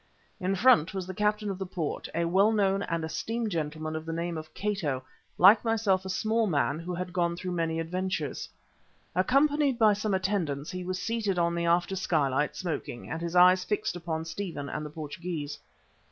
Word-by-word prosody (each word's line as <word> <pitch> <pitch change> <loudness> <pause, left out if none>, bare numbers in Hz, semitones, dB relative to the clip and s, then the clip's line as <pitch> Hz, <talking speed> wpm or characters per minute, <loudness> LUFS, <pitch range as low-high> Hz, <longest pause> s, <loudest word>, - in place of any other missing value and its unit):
In 190 +1 0
front 190 -5 +4
was 190 -2 -2
the 185 - -6
Captain 210 +1 0
of 190 - -6
the 190 - -2
port, 170 -4 -4
a 170 0 +1
well 195 +5 +4
known 195 -2 +2
and 165 -4 -2
esteemed 225 +7 -3
gentleman 155 -1 -3
of 155 - -4
the 165 - -5
name 170 +1 -2
of 155 0 -7
Cato, 165 -11 -1 0.3
like 205 +4 +7
myself 210 -5 +1
a - - -4
small 220 +3 +1
man 145 -3 +1
who 175 +1 -4
had 180 0 -5
gone 170 -2 +1
through 180 0 -4
many 165 -2 -1
adventures. 170 -3 -3 0.6
Accompanied 275 - +3
by 220 -3 +5
some 205 -1 -1
attendants, 180 -7 -1
he 185 0 -5
was 185 +1 -3
seated 210 -1 -1
on 170 0 +2
the 170 0 -1
after 175 +3 +2
skylight, 150 -6 +1
smoking, 160 -8 -5
with 165 - -3
his 170 +1 -3
eyes 180 +1 +7
fixed 210 -2 -1
upon 165 -2 -3
Stephen 165 -5 -5
and 150 - -4
the 150 - -6
Portugee. 155 +1 -5
180 Hz, 190 wpm, -28 LUFS, 165-200 Hz, 0.6 s, like